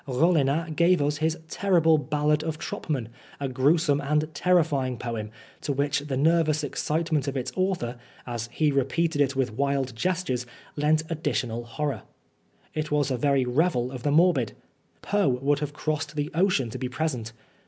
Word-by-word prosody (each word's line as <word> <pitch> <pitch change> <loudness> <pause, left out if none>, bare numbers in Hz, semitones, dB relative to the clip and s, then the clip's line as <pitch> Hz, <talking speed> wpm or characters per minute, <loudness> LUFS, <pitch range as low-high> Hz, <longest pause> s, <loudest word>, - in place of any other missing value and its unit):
Rollinat 155 +2 +2
gave 175 +2 +4
us 145 +1 0
his 160 +1 0
terrible 165 -4 +3
Ballad 150 +1 +1
of 160 -1 -3
Troppmann, 135 -7 -3 0.3
a 140 - -1
gruesome 145 +3 +2
and 150 +2 0
terrifying 145 -6 +2
poem, 115 -3 -4 0.3
to 145 - -2
which 140 +1 +1
the 140 -2 -3
nervous 155 0 +3
excitement 155 0 -1
of 140 0 -2
its 130 0 -3
author, 185 -11 -1 0.3
as 120 -2 -4
he 155 -2 +2
repeated 145 +3 +1
it 140 -1 +2
with 130 -4 0
wild 135 -1 -1
gestures, 150 -6 -1 0.3
lent 155 +1 +2
additional 120 -7 -2
horror. 135 -1 -3 0.7
It 155 0 -2
was 145 -2 +1
a - - +1
very 135 0 +2
revel 125 -1 +1
of 130 -2 -6
the 145 - 0
morbid. 150 - +3 0.5
Poe 205 -7 +2
would 135 +3 +1
have 145 -1 -4
crossed 155 0 -3
the 145 0 -2
ocean 165 - +2
to 130 - -6
be 130 - -3
present. 130 -4 -2
145 Hz, 165 wpm, -26 LUFS, 130-160 Hz, 0.7 s, gave